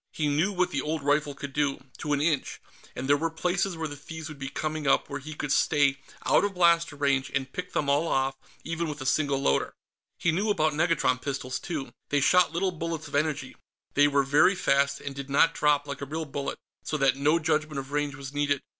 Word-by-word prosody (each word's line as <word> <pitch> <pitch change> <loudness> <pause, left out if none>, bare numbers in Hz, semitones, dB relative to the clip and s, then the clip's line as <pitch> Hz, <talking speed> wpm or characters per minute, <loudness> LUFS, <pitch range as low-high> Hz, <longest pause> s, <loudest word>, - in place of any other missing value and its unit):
He 150 - -1
knew 155 +8 +2
what 180 -2 0
the 140 - -1
old 155 0 -3
rifle 145 0 +1
could 140 0 -7
do, 140 -2 -1
to 150 - -3
an 145 -1 +2
inch, 150 -3 0 0.4
and 130 - -4
there 145 - +5
were 165 +3 -1
places 180 +2 -1
where 160 -1 -2
the 145 - -7
thieves 160 +2 -8
would 150 -2 -10
be 135 0 -4
coming 155 0 -3
up 135 - +2
where 145 - -3
he 155 +3 -8
could 145 -2 -3
stay 140 0 +3 0.3
out - - +4
of 205 -1 -1
blaster 170 -3 +3
range 140 -2 +1
and 130 -1 -2
pick 180 0 -5
them 145 - 0
all 145 +4 +2
off, 135 -2 +1 0.3
even 165 0 -2
with 150 -1 -6
a - - -5
single 140 +1 +2
loader. 70 - +1 0.4
He 170 - +1
knew 200 +7 0
about 155 -6 +2
negatron 155 -5 +1
pistols, 130 -2 -3
too. 155 -6 -5 0.2
They 145 - +2
shot 180 +6 +4
little 185 +3 0
bullets 165 -2 -4
of 145 - -14
energy; 145 -2 -1 0.4
they 145 +1 +5
were 140 -1 +2
very 145 +8 +4
fast, 140 -4 +2
and 140 - -5
did 140 0 -7
not 140 +4 +4
drop, 145 -1 +2
like 140 -1 -6
a - - -3
real 160 +3 -3
bullet, 140 -1 -4 0.3
so 155 - -2
that 135 -2 +3
no 145 +4 +3
judgment 155 -2 0
of 135 0 -5
range 145 -1 -1
was 135 -1 -8
needed. 145 -1 0
145 Hz, 230 wpm, -27 LUFS, 140-160 Hz, 0.4 s, there